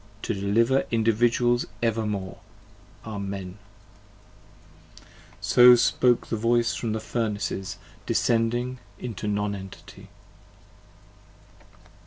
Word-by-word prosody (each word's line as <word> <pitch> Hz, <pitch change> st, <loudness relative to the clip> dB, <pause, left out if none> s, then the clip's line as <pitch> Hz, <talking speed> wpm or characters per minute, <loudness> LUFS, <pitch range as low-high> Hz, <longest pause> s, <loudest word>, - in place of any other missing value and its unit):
to -, -, -1 dB
deliver 115 Hz, +7 st, +2 dB
Individuals 120 Hz, +2 st, +2 dB, 0.2 s
evermore! 105 Hz, -4 st, -2 dB, 0.7 s
Amen. 100 Hz, -3 st, -6 dB, 1.4 s
17 -, -, -23 dB, 0.3 s
So 125 Hz, 0 st, +7 dB
spoke 120 Hz, 0 st, +2 dB
the -, -, -3 dB
voice 115 Hz, +1 st, +1 dB
from 115 Hz, -2 st, -3 dB
the 110 Hz, -, -2 dB
Furnaces, 105 Hz, -5 st, -3 dB, 0.3 s
descending 120 Hz, +2 st, 0 dB, 0.2 s
into 110 Hz, -3 st, -6 dB
Non 105 Hz, 0 st, -1 dB
Entity. 95 Hz, -1 st, -11 dB
115 Hz, 85 wpm, -25 LUFS, 100-120 Hz, 1.4 s, So